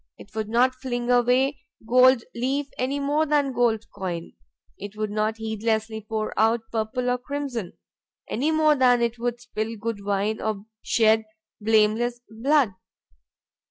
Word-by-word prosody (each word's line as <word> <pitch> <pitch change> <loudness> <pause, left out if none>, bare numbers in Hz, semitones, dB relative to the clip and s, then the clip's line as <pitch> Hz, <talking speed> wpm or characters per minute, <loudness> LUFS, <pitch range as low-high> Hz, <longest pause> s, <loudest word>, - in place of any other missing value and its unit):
It 200 - -15
would 215 -1 -3
not 245 +3 +3
fling 250 -1 -3
away 250 +3 +3 0.3
gold 255 0 +5
leaf 270 +4 -1
any 270 +3 -1
more 295 +3 +1
than 285 -2 +2
gold 230 -3 +1
coin; 175 -3 -5 0.4
it 205 +1 -9
would 215 -1 -2
not 215 +1 0
heedlessly 220 0 -2
pour 215 -1 -2
out 225 +1 +3
purple 230 +3 -2
or 250 0 +1
crimson, 255 -7 -4 0.5
any 270 +8 0
more 310 -1 +4
than 250 -3 +4
it 235 0 -1
would 240 0 -2
spill 230 -2 -4
good 215 -1 -4
wine 205 +2 -1
or 215 -2 -3 0.2
shed 220 -1 +3 0.4
blameless 220 +3 +2
blood. 240 +1 +2
235 Hz, 145 wpm, -25 LUFS, 220-255 Hz, 0.5 s, gold